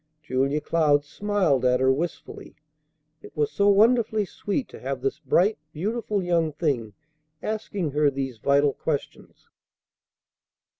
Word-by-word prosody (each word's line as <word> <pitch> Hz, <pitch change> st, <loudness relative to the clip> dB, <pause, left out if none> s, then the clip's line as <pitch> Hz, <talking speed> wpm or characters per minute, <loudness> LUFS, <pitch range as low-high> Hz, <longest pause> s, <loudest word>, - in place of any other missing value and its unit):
Julia 135 Hz, +2 st, 0 dB
Cloud 150 Hz, -3 st, +2 dB
smiled 185 Hz, -6 st, 0 dB
at 125 Hz, 0 st, +3 dB
her 130 Hz, 0 st, +4 dB
wistfully. 165 Hz, +5 st, -6 dB, 0.7 s
It -, -, -14 dB
was 150 Hz, -1 st, +1 dB
so 200 Hz, -, +2 dB
wonderfully 220 Hz, 0 st, +3 dB
sweet 205 Hz, +7 st, -3 dB
to -, -, -11 dB
have 135 Hz, +1 st, -4 dB
this 135 Hz, +1 st, -2 dB
bright, 200 Hz, +3 st, +2 dB
beautiful 210 Hz, +3 st, -2 dB
young 165 Hz, -3 st, +1 dB
thing 135 Hz, -, -1 dB, 0.5 s
asking 205 Hz, -6 st, -3 dB
her 150 Hz, +1 st, +3 dB
these 135 Hz, -4 st, -4 dB
vital 140 Hz, +3 st, +3 dB
questions. 145 Hz, +2 st, -5 dB
150 Hz, 130 wpm, -25 LUFS, 135-200 Hz, 0.7 s, her